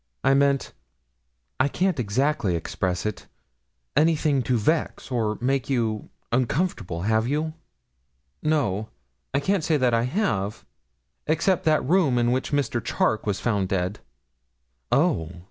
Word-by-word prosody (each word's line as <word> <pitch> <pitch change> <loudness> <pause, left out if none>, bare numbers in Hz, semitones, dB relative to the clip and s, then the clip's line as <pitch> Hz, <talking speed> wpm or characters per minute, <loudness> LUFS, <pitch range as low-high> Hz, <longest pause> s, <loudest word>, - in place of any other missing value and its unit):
I 135 - +4
meant 140 0 +2 0.9
I 130 - +4
can't 180 +1 0
exactly 120 - +1
express 90 +2 -2
it 105 - -4 0.7
anything 150 -2 +3
to 125 0 +1
vex, 155 +5 -1
or 110 -3 0
make 135 +1 0
you 115 -5 -1 0.2
uncomfortable; 120 - -1
have 110 +2 +2
you?' 155 +3 -1 0.9
'No, 115 -10 0 0.4
I 140 - +1
can't 190 +4 0
say 160 - +2
I 120 -3 +3
have, 125 - -1 0.6
except 170 +4 +1
that 155 -4 +2
room 160 -7 +3
in 120 0 +2
which 130 +1 -1
Mr. 135 -5 0
Charke 110 0 0
was 100 -2 0
found 100 -5 0
dead.' 95 +1 -1 0.9
'Oh! 135 - +2
130 Hz, 130 wpm, -25 LUFS, 110-150 Hz, 0.9 s, I